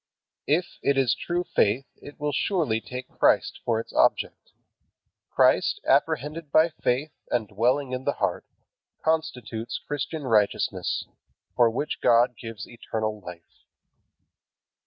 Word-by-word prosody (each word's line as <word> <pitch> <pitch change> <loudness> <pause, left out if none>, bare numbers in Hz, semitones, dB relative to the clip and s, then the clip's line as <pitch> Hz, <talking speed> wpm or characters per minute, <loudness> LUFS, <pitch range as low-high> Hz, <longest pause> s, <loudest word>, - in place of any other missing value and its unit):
If 170 +5 0
it 140 -1 +2
is 130 -3 +3
true 175 +1 -2
faith 125 -5 +1
it 145 - -13
will 150 0 -1
surely 145 - 0
take 125 +2 -7
Christ - - +3
for 115 -2 +1
its 115 - -8
object. - - +1 0.8
Christ, - - +3
apprehended 150 +3 +1
by 160 +2 +5
faith 145 -1 -1 0.2
and 115 -3 0
dwelling 125 +6 +1
in 130 0 -3
the 145 - +1
heart, - - -2 0.6
constitutes 125 -9 -2
Christian 145 +1 -4
righteousness, 110 -5 +1 0.5
for 120 -1 +5
which 135 +6 -3
God 120 +1 +4
gives 115 -1 -8
eternal 110 -2 -4
life. 90 -2 -12
125 Hz, 125 wpm, -26 LUFS, 115-150 Hz, 0.8 s, by